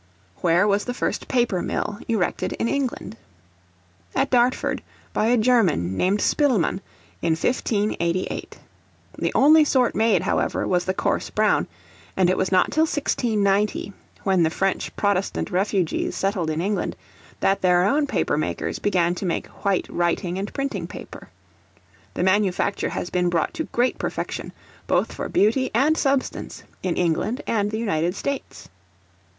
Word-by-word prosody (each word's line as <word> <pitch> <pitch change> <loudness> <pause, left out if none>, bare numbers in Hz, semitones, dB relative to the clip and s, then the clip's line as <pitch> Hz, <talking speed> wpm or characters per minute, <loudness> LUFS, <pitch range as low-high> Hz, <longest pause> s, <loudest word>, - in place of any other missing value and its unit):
Where 175 +4 +3
was 205 0 +1
the 245 - -3
first - - -2
Paper 240 -8 +1
Mill 205 - -3
erected 215 -6 -1
in - - -1
England? 255 -5 -2 1.0
At 270 +1 +1
Dartford, 250 0 +2 0.3
by 215 - +1
a 245 +1 +4
German 200 - +2
named 195 - +1
Spilman, 230 - +2 0.4
in 165 -1 +2
1588. 185 -3 -1 0.6
The - - 0
only 310 +3 +7
sort 260 -4 +2
made, 220 -5 +2
however, - - 0
was 180 -1 +1
the 185 - -1
coarse - - -1
brown; - - +2 0.5
and 185 -1 +4
it - - +1
was 190 - 0
not 185 -1 +3
till 315 +1 +3
1690, 210 -9 0 0.3
when 190 -3 +2
the 160 - +3
French 195 +3 -1
protestant 200 -2 0
refugees 185 -2 0
settled 195 -4 -1
in 155 +1 -1
England, 200 +2 -1 0.4
that 195 - +1
their 180 -1 +4
own 285 +8 +2
paper - - 0
makers - - -2
began 175 -4 +1
to 180 - -5
make 170 - -1 0.2
white 200 -2 +1
writing 175 +1 -1
and 200 +2 -4
printing 275 0 -3
paper. - - -10 0.9
The - - -1
manufacture 195 +1 +1
has 175 - -4
been 180 -1 +1
brought 170 -1 0
to 320 - -3
great 245 +2 0
perfection, - - -4 0.4
both - - +1
for - - -5
beauty 230 +6 +2
and 290 +6 +4
substance, 275 -3 -1 0.2
in 180 -2 -1
England 180 +7 0
and 205 -2 0
the 215 - -3
United 175 -5 0
States. 280 +5 -5
200 Hz, 150 wpm, -23 LUFS, 180-240 Hz, 1.0 s, only